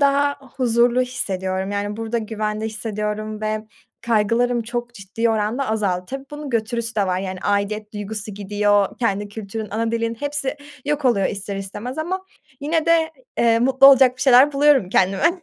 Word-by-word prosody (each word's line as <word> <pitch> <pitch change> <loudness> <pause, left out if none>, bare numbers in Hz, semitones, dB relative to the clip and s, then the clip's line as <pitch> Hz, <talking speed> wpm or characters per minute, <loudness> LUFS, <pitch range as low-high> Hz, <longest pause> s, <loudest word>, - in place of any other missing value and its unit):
daha 285 0 +3 0.2
huzurlu 240 0 +3
hissediyorum. 190 -6 -3
Yani, 205 +1 -3
burada 225 +1 -2
güvende 215 0 -3
hissediyorum 215 -1 -4
ve 215 0 -2 0.3
kaygılarım 235 +2 +1
çok 240 +1 -5
ciddi 225 +3 -2
oranda 220 +5 -1
azaldı. 195 -5 0
Tabii 270 +1 -6
bunun 295 -1 -7
götürüsü 230 0 -1
de 200 -3 +1
var, 185 0 0
yani, 190 -1 -5
aidiyet 205 +1 -1
duygusu 210 0 -5
gidiyor, 205 0 +1
kendi 205 -3 -1
kültürün, 215 0 -6
ana 225 +2 -1
dilin 230 0 -1
hepsi 290 +2 -3 0.3
yok 295 0 -1
oluyor 220 -7 +3
ister 200 0 -4
istemez 210 +7 -6
ama 360 +4 -2 0.4
yine 315 +3 0
de, 330 -1 +3 0.3
eee, 230 -1 +4
mutlu 265 +3 +5
olacak 265 -2 +7
bir 255 - -3
şeyler 265 +2 +6
buluyorum 275 -7 +4
kendime. 230 - +2
225 Hz, 160 wpm, -21 LUFS, 205-255 Hz, 0.4 s, olacak